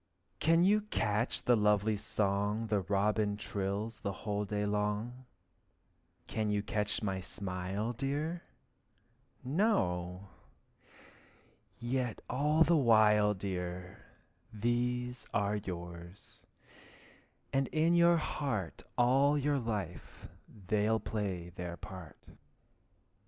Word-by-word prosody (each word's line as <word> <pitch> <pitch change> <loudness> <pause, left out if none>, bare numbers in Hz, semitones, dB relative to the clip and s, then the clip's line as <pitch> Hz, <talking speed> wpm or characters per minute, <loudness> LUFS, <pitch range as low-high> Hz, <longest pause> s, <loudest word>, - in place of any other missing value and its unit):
Can 165 +2 +4
you 210 +3 +4
catch 115 - 0
the 120 - +5
lovely 105 0 +3
song 105 +2 0 0.2
Robin 105 +1 +1
trills 105 +2 -3
the 100 -4 -2
whole 105 -1 -1
day 105 0 -1
long? 105 +5 -2 1.0
Can 110 -1 -2
you 105 -1 0
catch 105 0 -1
my 95 -2 -1
smile, 95 +4 -3
dear? 145 +7 -2 1.0
No! 95 - 0 1.5
yet 120 -1 -2
all 150 +4 +3
the 170 +2 +4
while, 105 -6 +5
dear, 90 -1 -5 0.5
These 125 +2 -1
are 100 +1 +1
yours, 85 -2 -8 1.1
and 135 -1 +2
in 160 +2 +2
your 170 0 +6
heart 135 - -2 0.2
All 135 +4 +4
your 145 0 +1
life 105 -8 -5 0.4
they'll 110 +3 +2
play 95 -7 -3
their 90 0 -6
part. 90 -5 -9
105 Hz, 100 wpm, -33 LUFS, 100-125 Hz, 1.5 s, your